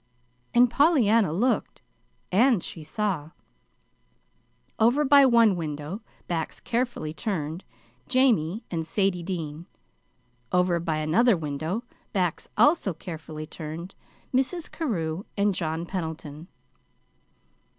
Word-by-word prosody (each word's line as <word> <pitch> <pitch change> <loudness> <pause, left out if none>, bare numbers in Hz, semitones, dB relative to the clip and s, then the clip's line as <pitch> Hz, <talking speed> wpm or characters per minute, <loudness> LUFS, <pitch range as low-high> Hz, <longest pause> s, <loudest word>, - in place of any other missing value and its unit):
And 245 +1 +7
Pollyanna 235 - +4
looked; 235 +10 0 0.5
and 225 0 +4
she 160 - -7
saw: 185 -5 -2 1.5
Over 245 +7 +4
by 280 0 +7
one 230 -5 +5
window, 155 +4 -5 0.3
backs 165 -2 -3
carefully 235 -10 -2
turned, 165 -3 -3 0.4
Jamie 225 -6 +2
and 165 -2 -1
Sadie 190 -1 +1
Dean; 165 -2 -5 0.8
over 180 -1 +2
by 165 -2 -1
another 185 +9 +3
window, 160 +8 -3 0.3
backs 180 -5 -1
also 290 - +4
carefully 155 -2 -7
turned, 160 +4 -7 0.4
Mrs. 285 +6 0
Carew 180 - -2
and 200 0 +3
John 165 -1 -2
Pendleton. 160 -3 -5
180 Hz, 100 wpm, -26 LUFS, 160-235 Hz, 1.5 s, And